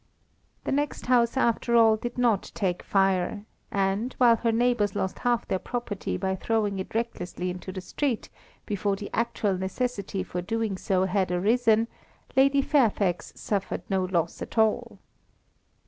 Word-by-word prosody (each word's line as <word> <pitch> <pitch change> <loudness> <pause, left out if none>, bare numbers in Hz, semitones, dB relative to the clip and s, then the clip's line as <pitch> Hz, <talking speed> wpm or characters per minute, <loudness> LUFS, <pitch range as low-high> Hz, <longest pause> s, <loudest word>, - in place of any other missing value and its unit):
The - - -2
next 290 +1 -1
house, 245 0 +3
after 235 -1 +2
all, 225 -1 +6
did 240 +3 -5
not 235 -5 +2
take 180 -3 -1
fire, 195 +1 +1 0.2
and, 200 +5 0
while 235 -2 +6
her 230 0 +1
neighbours 230 -3 +1
lost 190 - -2
half 240 -1 0
their 190 - 0
property 240 -4 -3
by 190 -1 -1
throwing 205 -1 0
it 190 - -6
recklessly 180 -6 -2
into 180 +1 -7
the 185 0 -6
street, 250 +5 -2 0.4
before 205 -1 0
the 200 +1 -7
actual 220 -4 0
necessity 200 -1 -2
for 180 -1 -4
doing 220 +2 -1
so 185 0 +1
had 190 -1 0
arisen, 225 +4 +3 0.5
Lady 275 +1 +4
Fairfax 215 - +1
suffered 200 -2 -2
no 190 -1 +2
loss 170 -2 -1
at - - -7
all. 220 -1 +2
210 Hz, 150 wpm, -27 LUFS, 190-235 Hz, 0.5 s, all